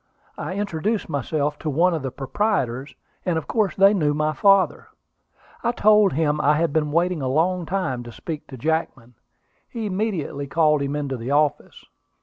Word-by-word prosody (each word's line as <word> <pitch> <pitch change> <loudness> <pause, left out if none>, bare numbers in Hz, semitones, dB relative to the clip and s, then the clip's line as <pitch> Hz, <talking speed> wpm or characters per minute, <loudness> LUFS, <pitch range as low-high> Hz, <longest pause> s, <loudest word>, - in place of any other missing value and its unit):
I 185 - -5
introduced 200 +1 -2
myself 145 +1 -2
to 155 - -3
one 170 +5 +2
of 160 - -2
the 135 - -3
proprietors; 135 - -2 0.3
and 175 -3 0
of 160 - -3
course 215 -4 0
they 195 +1 +6
knew 150 -7 +1
my 155 +1 0
father. 195 -1 +3 0.8
I 235 - +1
told 210 -3 +4
him 150 0 +1
I 150 +1 +4
had 165 -1 0
been 150 -2 0
waiting 170 0 +1
a 130 - -2
long 170 +5 0
time 180 -10 -2
to 120 - -9
speak 155 +5 -7
to 130 - -10
Jackman. 135 -4 -2 0.6
He 230 -3 -5
immediately 185 -8 -2
called 150 -1 +2
him 140 +1 -2
into 140 -3 -3
the 120 +2 -6
office. 145 0 0
155 Hz, 175 wpm, -23 LUFS, 145-190 Hz, 0.8 s, they